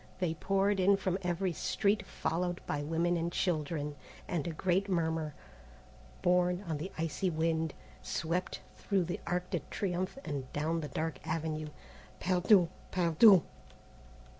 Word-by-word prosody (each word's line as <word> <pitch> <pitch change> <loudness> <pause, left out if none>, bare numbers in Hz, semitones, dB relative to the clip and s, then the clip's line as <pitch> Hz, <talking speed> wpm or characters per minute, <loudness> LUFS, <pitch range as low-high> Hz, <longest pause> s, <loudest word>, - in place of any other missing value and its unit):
They 180 -3 0
poured 195 +4 +1
in 195 +2 +5
from 190 -1 -1
every 180 0 0
street 200 +4 0
followed 175 +1 -1
by 145 - -2
women 165 +4 +1
and 170 +1 -1
children, 150 -4 -1 0.3
and 175 -3 -1
a - - -1
great 190 +4 0
murmur, 160 -4 0 0.9
borne 180 +1 +3
on 160 -5 -3
the 185 +6 -5
icy 165 +3 -1
wind, 160 -1 0 0.3
swept 170 +3 -2 0.2
through 195 -3 +1
the 175 +1 -3
Arc 180 +1 -1
de - - +1
Triomphe 185 +2 -2
and 140 -4 -4
down 160 +3 0
the 150 - -4
dark 160 -2 -3
avenue, 155 -1 -2 0.5
"Perdus! 180 0 +4 0.2
perdus!" 180 +2 +6
175 Hz, 140 wpm, -32 LUFS, 160-185 Hz, 0.9 s, perdus